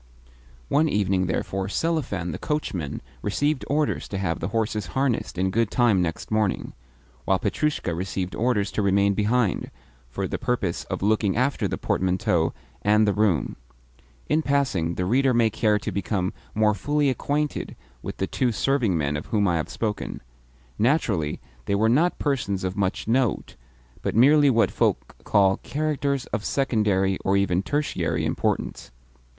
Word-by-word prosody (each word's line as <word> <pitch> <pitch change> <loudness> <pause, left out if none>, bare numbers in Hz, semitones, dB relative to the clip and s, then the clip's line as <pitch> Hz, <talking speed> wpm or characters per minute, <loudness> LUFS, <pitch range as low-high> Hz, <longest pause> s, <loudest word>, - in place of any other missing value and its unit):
One 155 +2 +2
evening, 95 -4 +1
therefore, 95 +1 -2
Selifan 110 - -1
the - - -6
coachman 95 - -3 0.2
received 145 - 0
orders 150 +1 0
to 100 - -4
have 90 -4 -1
the 85 - -2
horses 105 -2 -1
harnessed 130 -8 0
in 95 +1 +1
good 115 +1 +1
time 115 -7 +3
next 80 +3 -3
morning; 110 -2 0 0.5
while 95 - +3
Petrushka 105 - -1
received 90 +1 -3
orders 115 -3 0
to - - -1
remain 100 0 +3
behind, 105 0 +1 0.4
for - - -3
the - - -4
purpose 125 -8 -1
of - - -4
looking 105 -1 +2
after 130 +3 +1
the - - -3
portmanteau 90 -3 +1 0.3
and 105 +1 +4
the 100 - +3
room. 100 -8 +1 0.7
In 155 - +2
passing, 130 - 0
the 90 - -1
reader 130 +5 +3
may 115 -2 +3
care 105 -1 +2
to 105 +1 -4
become 95 0 -1 0.2
more 110 0 +3
fully 145 +7 +1
acquainted 145 +3 -2 0.3
with - - -6
the 95 - 0
two 125 +5 0
serving 115 -5 +1
men 75 -1 -1
of 75 - -5
whom 105 -2 +1
I 85 -2 +2
have 80 - -3
spoken. 105 - -4 0.6
Naturally, 105 - +1 0.3
they 100 - 0
were 110 +3 +3
not 160 +9 +3
persons 125 -10 -1
of 95 0 -2
much 100 -1 -1
note, 125 +1 0 0.5
but - - -2
merely 145 +5 +6
what 115 -3 +3
folk - - 0
call 95 -2 +3
characters 145 -3 -1
of 105 0 -1
secondary, 105 -9 +1
or 95 +1 +1
even 95 -3 +2
of 100 - -4
tertiary, 145 0 -1
importance. - - -2
105 Hz, 160 wpm, -24 LUFS, 95-130 Hz, 0.7 s, merely